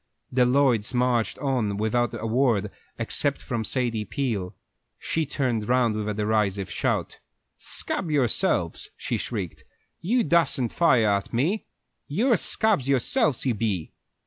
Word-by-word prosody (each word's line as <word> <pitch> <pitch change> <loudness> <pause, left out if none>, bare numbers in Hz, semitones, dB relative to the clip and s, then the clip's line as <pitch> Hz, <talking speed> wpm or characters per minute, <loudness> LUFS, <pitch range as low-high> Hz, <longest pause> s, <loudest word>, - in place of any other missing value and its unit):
The 125 -1 +3
Lloyds 125 -3 +2
marched 125 -2 +1
on 125 -8 -1
without 120 +3 0
a 110 - -5
word, 115 -4 +1 0.3
except - - -1
from 115 -2 -3
Sadie 115 -2 -1
Peel. 105 -5 -3 0.4
She 160 -2 -2
turned 120 -7 -1
round 125 -3 +3
with 105 0 -2
a - - -1
derisive 105 -3 0
shout. - - -1 0.4
"Scab 180 - -2
yourselves!" 135 -7 +1
she - - -2
shrieked. 100 -8 -5 0.4
"You 235 +8 +1
dassen't 165 - +2
fire 130 -10 +4
at 100 -1 0
me. 160 - 0 0.4
You're 230 - +2
scabs 195 - +2
yourselves, 140 - +1
you 130 - +2
be!" 105 -7 -2
120 Hz, 135 wpm, -25 LUFS, 105-140 Hz, 0.4 s, fire